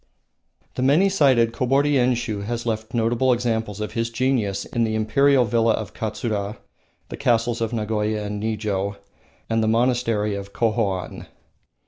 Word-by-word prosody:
The - - -4
many 150 +9 +4
sided 130 -11 +3
Kobori 135 +4 +2
Enshiu 120 -5 0
has 120 +1 -3
left 110 0 -3
notable 120 +3 +2
examples 115 -4 -1
of 105 - -4
his 115 0 -2
genius 115 -5 0
in 120 - -1
the 110 -1 0
Imperial 125 +5 +3
villa 115 -1 +2
of 110 -2 -4
Katsura, 105 -1 -3 0.5
the - - -6
castles 120 -3 +1
of 115 -1 -1
Nagoya 105 -1 -1
and 105 0 -4
Nijo, 105 -2 -2 0.5
and 115 0 +1
the 110 - +1
monastery 115 -2 +1
of 100 0 -6
Kohoan. 105 -5 -1
115 Hz, 145 wpm, -23 LUFS, 105-120 Hz, 0.5 s, many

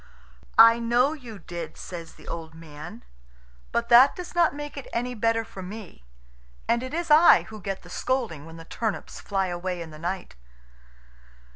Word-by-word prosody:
"I 230 +1 +9
know 240 +5 +2
you 245 -8 -9
did," 170 -3 -7
says 170 -2 -8
the - - -16
old 160 -1 -6
man; 150 -6 -10 0.7
"but 235 0 0
that 250 +4 +8
does 360 - -8
not 340 -4 +3
make 295 0 -7
it 280 - -7
any 245 +1 -2
better 225 0 +1
for 190 - -10
me. 185 - -10 0.6
And 235 - +2
it 255 0 -6
is 335 0 -2
I 320 +3 +8
who 215 -1 -9
get 195 0 -4
the 175 - -13
scolding 225 - -2
when 165 0 -11
the 165 - -11
turnips 220 +4 -4
fly 195 -2 -1
away 180 0 -3
in 165 -2 -7
the 155 - -11
night." 175 - -4
215 Hz, 175 wpm, -26 LUFS, 170-250 Hz, 0.7 s, I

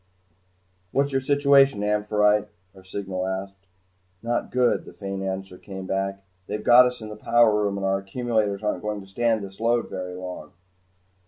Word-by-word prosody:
"What's 140 +1 +1
your 135 0 +1
situation, 140 -4 +4
'Amphitrite'?" 105 0 +2 0.3
our 95 - -15
signal 95 -1 -4
asked. 95 0 -6 0.6
"Not 120 +1 -1
good," 125 -1 +2
the - - -12
faint 95 -1 -5
answer 95 -1 -5
came 95 -1 -8
back. 95 +1 -2 0.2
"They've 105 - -4
got 125 +1 +8
us 125 -1 -5
in 110 - -7
the 105 - -7
power 115 -1 +3
room 100 -1 -1
and 100 - -3
our 95 0 +1
accumulators 105 0 -1
aren't 105 - -1
going 105 -1 -3
to 95 - -14
stand 110 +2 0
this 95 0 -10
load 120 +1 +1
very 90 -1 -5
long. 90 -4 -8
105 Hz, 170 wpm, -24 LUFS, 95-120 Hz, 0.6 s, got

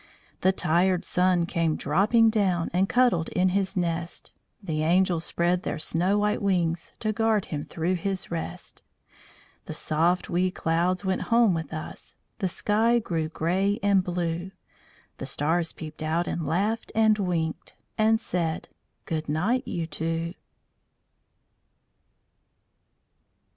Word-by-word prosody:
The 190 - +4
tired 180 0 +1
Sun 180 -1 +2
came 165 -2 0
dropping 215 +9 +3
down, 190 -6 +1
And 190 +2 +2
cuddled 245 -10 +3
in 185 +1 +2
his 195 +1 0
nest. 170 -1 -3 0.3
The 160 -7 -3
angels 175 +1 +2
spread 175 +1 +1
their - - -3
snow 180 +6 +1
white 210 0 +1
wings 175 -4 0
To 215 -1 0
guard 220 -2 +1
him 145 -1 -3
through 170 +3 -1
his 190 +1 -3
rest. 165 -1 -5 0.8
The - - -6
soft 170 +4 +1
wee 180 +2 +1
clouds 180 +2 0
went 190 0 0
home 230 -4 +5
with 160 -3 -4
us, 155 0 -7 0.2
The 195 - 0
sky 220 +6 +2
grew 165 -8 -2
grey 190 +6 0
and 200 -2 +4
blue; 175 0 -2 0.7
The - - -4
stars 165 +3 0
peeped 155 -1 -9
out 160 +2 0
and 165 -3 -3
laughed 210 +8 -1
and 220 -1 +4
winked, 170 -4 -2 0.2
And 220 0 +3
said: 170 -7 -2 0.4
"Good 155 -2 -3
night, 205 +12 0
you 170 -1 -2
two!" 165 +2 -3
180 Hz, 130 wpm, -26 LUFS, 165-200 Hz, 0.8 s, home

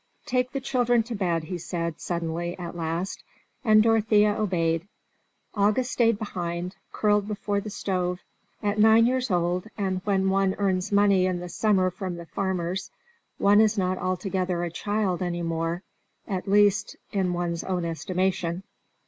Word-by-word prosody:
"Take 250 0 0
the 275 - -2
children 245 -3 +2
to 235 +2 -6
bed," 175 -5 0
he 180 +2 -5
said, 170 -1 -3
suddenly, 170 0 -3
at 175 -1 -6
last, 170 +3 -3 0.4
and 215 -3 +6
Dorothea 215 -2 +4
obeyed. 170 -5 0 0.7
August 215 +5 +1
stayed 230 -3 +3
behind, 180 -3 -4 0.2
curled 210 -1 +2
before 205 -1 -2
the 215 - -6
stove; 180 -3 -2 0.4
at 205 +1 0
nine 220 +1 +6
years 255 0 +1
old, 180 +1 0
and 190 -2 -1
when 195 -2 +1
one 195 0 +2
earns 190 -2 0
money 200 -2 +4
in 185 -1 -1
the 175 0 -7
summer 185 0 +2
from 185 -1 -5
the 170 0 -8
farmers, 190 0 -2 0.5
one 205 +2 +5
is 220 0 +3
not 185 -1 0
altogether 185 -1 -1
a 170 - -3
child 205 0 -1
any 175 -1 -2
more, 165 +2 -2 0.4
at 190 -1 -3
least 205 0 +3 0.2
in 190 -3 0
one's 175 -1 -2
own 180 -2 -2
estimation. 180 +1 -1
190 Hz, 155 wpm, -26 LUFS, 175-210 Hz, 0.7 s, and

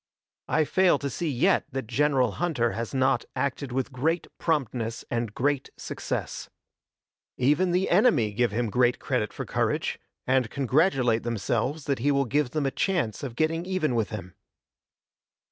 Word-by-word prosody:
I 155 - +2
fail 185 -1 +3
to 140 0 -4
see 165 +6 -2
yet 155 +9 +2
that 135 -2 -3
General 130 0 +2
Hunter 140 -10 +1
has 115 0 -4
not 130 0 +2
acted 140 -1 -2
with 130 +2 -2
great 160 +7 0
promptness 120 -7 -1
and 115 -2 -1
great 140 +1 0
success. - - -4 0.9
Even 150 +8 +3
the 180 +2 +1
enemy 175 - +3
give 120 +1 +1
him 115 0 -1
great 125 +2 +3
credit 125 -6 -1
for - - -6
courage, - - -1 0.3
and 130 -2 +2
congratulate 130 -4 +2
themselves 120 +6 -1
that 140 -3 0
he 140 +5 +1
will 140 -1 +2
give 145 +2 +1
them 150 +2 -1
a 135 - +1
chance 165 - -1
of 130 -5 -5
getting 160 +3 0
even 185 -8 0
with 115 -3 0
him. 95 -4 -7
135 Hz, 160 wpm, -26 LUFS, 120-155 Hz, 0.9 s, fail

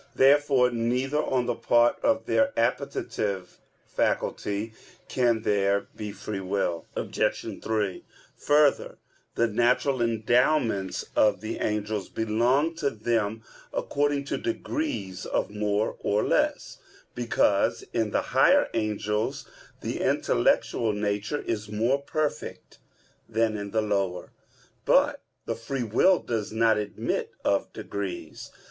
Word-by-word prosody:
Therefore 135 -2 +4
neither 125 +5 0
on 125 -4 0
the 120 - 0
part 120 0 +3
of 280 -1 +1
their 280 0 +1
appetitive 100 - -2 0.3
faculty 105 +2 -1 0.3
can 120 -3 +1
there 100 -1 +1
be 105 -1 -5
free 105 0 -5
will. 95 -3 -2
Obj. - - -2
3: 105 -4 -1 0.3
Further, 145 -1 +2 0.4
the 115 - +3
natural 120 +4 +2
endowments 115 -2 +1
of 105 - +4
the 110 +1 -4
angels 105 -2 -2
belong 120 +8 +1
to 145 -4 +1
them 110 -1 -1 0.3
according 145 0 0
to - - -2
degrees 300 - -3
of - - -1
more 105 0 -1
or 105 +1 +1
less; - - 0 0.3
because 115 -4 +1
in 110 -2 +1
the - - +1
higher - - +5
angels 105 -1 -1 0.3
the - - -3
intellectual 105 - +1
nature 105 +6 -2
is 105 -2 -3
more 115 +6 +1
perfect 150 -2 -4 0.5
than 110 -1 +1
in 100 -1 -5
the 110 +1 0
lower. 100 -4 -1 0.5
But - - +3 0.2
the - - -1
free 125 +3 -4
will 120 - +4
does 110 -8 -3
not 110 -1 +3
admit 105 -1 -2 0.2
of - - +1
degrees. 100 -3 -6
110 Hz, 120 wpm, -26 LUFS, 105-125 Hz, 0.5 s, higher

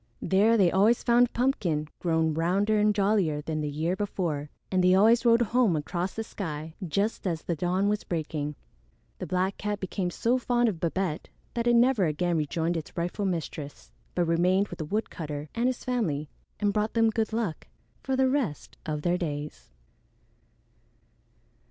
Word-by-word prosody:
There 210 +4 +3
they 185 -5 +4
always 210 +5 +3
found 240 0 +4
Pumpkin 185 - 0
grown 160 -2 +1
rounder 195 +7 +1
and 210 0 +4
jollier 195 -7 +2
than 155 +1 -3
the 150 - -2
year 160 +5 -1
before, 170 -7 -2 0.2
and 185 -1 +2
they 185 0 +5
always 225 +5 +5
rode 235 +1 +5
home 235 -5 +2
across 175 +5 -3
the 225 - -2
sky 160 -7 -6
just 200 +5 -1
as 165 -3 -2
the 170 - -2
dawn 180 +5 0
was 210 0 0
breaking. 150 -3 -3 0.6
The 185 - -5
black 185 +3 0
cat 210 0 -3
became 190 -1 -2
so 235 +8 +1
fond 240 -1 +2
of 180 -6 -5
Babette 170 0 -2 0.2
that 235 -1 -1
it 240 - +5
never 235 -4 +4
again 170 +3 0
rejoined 165 +3 -1
its 160 - -8
rightful 175 +4 -2
mistress, 160 -5 -4 0.2
but 175 - +2
remained 180 +4 +2
with - - -8
the 155 - -3
woodcutter 150 -6 -4
and 235 +2 +1
his 255 -1 -2
family 165 - -1 0.3
and 205 -1 +1
brought 215 +2 -1
them 225 -1 +4
good 220 0 -1
luck 220 -8 -3 0.3
for 265 - -1
the 260 0 +3
rest 255 - -2
of 150 -1 -3
their 175 +1 +1
days. 150 -3 -5
185 Hz, 170 wpm, -27 LUFS, 160-220 Hz, 0.6 s, they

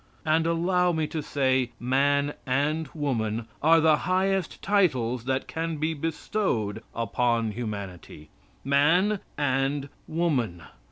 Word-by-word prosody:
And 160 +1 +2
allow 180 +2 +2
me 160 -2 0
to 155 0 -4
say 130 -4 0
"man" 140 +3 +2
and 145 +5 0
"woman" 115 -7 -1 0.2
are 165 +2 +6
the 155 -1 +5
highest 190 0 0
titles 130 - +1
that 130 +1 -1
can 165 0 -3
be 155 +2 0
bestowed 155 - -2
upon 115 0 0
humanity. 100 -8 -7 0.3
"Man" 165 +10 +3 0.2
and 140 0 0 0.2
"woman." 130 - -1
145 Hz, 115 wpm, -26 LUFS, 120-165 Hz, 0.3 s, are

